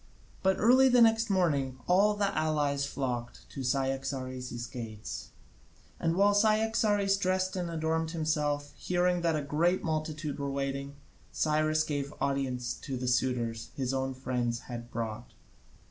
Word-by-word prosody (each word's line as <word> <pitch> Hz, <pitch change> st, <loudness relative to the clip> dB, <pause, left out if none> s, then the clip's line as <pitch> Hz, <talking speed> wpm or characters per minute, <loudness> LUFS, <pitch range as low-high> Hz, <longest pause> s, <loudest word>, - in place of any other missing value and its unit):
But 190 Hz, 0 st, +3 dB
early 260 Hz, +4 st, +6 dB
the 250 Hz, -1 st, +5 dB
next 225 Hz, -1 st, +5 dB
morning 145 Hz, -9 st, +1 dB
all 200 Hz, +4 st, +4 dB
the 200 Hz, -1 st, 0 dB
allies 145 Hz, -2 st, +1 dB
flocked 120 Hz, -4 st, -4 dB
to 135 Hz, -, -6 dB
Cyaxares' 130 Hz, -2 st, -2 dB
gates, 110 Hz, -3 st, -7 dB, 0.7 s
and 165 Hz, 0 st, +1 dB
while 200 Hz, +2 st, +4 dB
Cyaxares 215 Hz, -1 st, +3 dB
dressed 185 Hz, -1 st, 0 dB
and 175 Hz, -2 st, -2 dB
adorned 160 Hz, 0 st, -1 dB
himself, 150 Hz, -3 st, -1 dB
hearing 180 Hz, 0 st, +1 dB
that 165 Hz, -2 st, +2 dB
a 150 Hz, -, -1 dB
great 165 Hz, +6 st, +1 dB
multitude 155 Hz, -2 st, -3 dB
were 140 Hz, 0 st, -2 dB
waiting, 140 Hz, 0 st, -3 dB, 0.4 s
Cyrus 155 Hz, 0 st, +2 dB
gave 145 Hz, -2 st, -3 dB
audience 130 Hz, -3 st, -1 dB
to 135 Hz, -3 st, -4 dB
the 125 Hz, 0 st, -3 dB
suitors 120 Hz, -2 st, 0 dB
his 130 Hz, -1 st, -1 dB
own 130 Hz, 0 st, -1 dB
friends 125 Hz, -2 st, -2 dB
had 120 Hz, -1 st, -7 dB
brought. 115 Hz, 0 st, -5 dB
145 Hz, 140 wpm, -30 LUFS, 130-180 Hz, 0.7 s, early